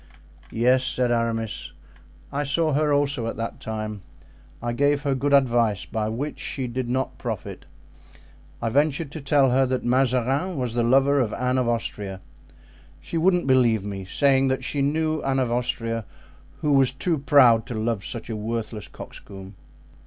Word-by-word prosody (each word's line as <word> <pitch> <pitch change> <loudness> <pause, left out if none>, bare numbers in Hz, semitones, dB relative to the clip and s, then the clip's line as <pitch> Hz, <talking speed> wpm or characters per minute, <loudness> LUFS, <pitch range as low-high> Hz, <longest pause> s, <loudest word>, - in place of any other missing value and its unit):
"Yes," 125 +3 +2
said 125 -1 0
Aramis, 115 -2 -2 0.6
"I 145 +1 0
saw 155 +2 +1
her 150 +1 +2
also 140 -4 +1
at - - -4
that 115 0 -4
time. 110 -2 -5 0.6
I 120 0 -3
gave 145 +3 +1
her 140 -2 +1
good 140 +2 -1
advice, 120 -7 +3
by 110 -1 -2
which 135 +7 -4
she 130 - -3
did 125 0 -3
not 130 +2 -2
profit. - - -5 1.0
I 115 - +1
ventured 145 +3 +1
to 155 - -7
tell 140 -2 +3
her 130 +1 +3
that 130 0 -2
Mazarin 130 +7 +1
was 125 -3 -2
the 120 - +1
lover 135 +4 +4
of 115 -5 0
Anne 125 0 0
of 125 - 0
Austria. 105 -4 -3 0.8
She 165 - -3
wouldn't 180 0 +3
believe 120 -6 +3
me, 100 -1 -5
saying 135 +7 +2
that 130 -1 -1
she 140 +1 -2
knew 155 +2 0
Anne 135 0 0
of 125 -3 0
Austria, 115 -2 -2 0.6
who 150 -1 +2
was 135 -2 +5
too 155 +4 -1
proud 130 -6 +5
to 120 - -5
love 110 -2 -1
such 115 - -6
a 110 - -4
worthless 110 0 -4
coxcomb. 95 0 -11
130 Hz, 165 wpm, -24 LUFS, 115-140 Hz, 1.0 s, was